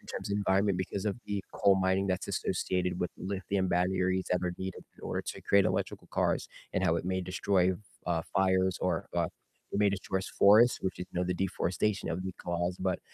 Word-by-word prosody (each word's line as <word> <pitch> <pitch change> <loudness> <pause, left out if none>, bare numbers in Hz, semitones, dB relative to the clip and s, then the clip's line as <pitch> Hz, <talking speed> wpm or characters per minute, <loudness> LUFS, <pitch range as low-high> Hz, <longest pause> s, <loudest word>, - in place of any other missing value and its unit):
in - - -21
terms - - -5
of 100 - +1
environment 100 -1 +2
because 95 +1 -3
of 100 - 0
the 100 -2 -2
coal 100 -1 +4
mining 95 +1 +2
that's 95 -1 -1
associated 90 -1 -1
with 90 - -1
lithium 95 0 -1
batteries 95 +1 +1
that 90 - +2
are 90 - 0
needed 95 0 -5
in - - -19
order - - -2
to - - -6
create 100 -1 +4
electrical - - -1
cars, - - +1 0.3
and - - +1
how 80 - +3
it 85 - -3
may 95 0 0
destroy, 90 0 +2
f - - -6 0.3
uh, 85 -2 +1
fires 95 -1 +2
or, 90 -3 0
uh, 85 -1 +2 0.5
it - - 0
may 105 - +5
destroys 95 -1 -2
forests, 110 +5 +6
which 95 -1 -3
is, 90 - -4
you 90 - -4
know, 90 - +1
the 90 - 0
deforestation 95 +2 -1
that 85 - 0
would 90 - -4
be 95 - -2
caused, 85 +1 -2
but 95 -1 0
95 Hz, 220 wpm, -31 LUFS, 90-95 Hz, 0.5 s, forests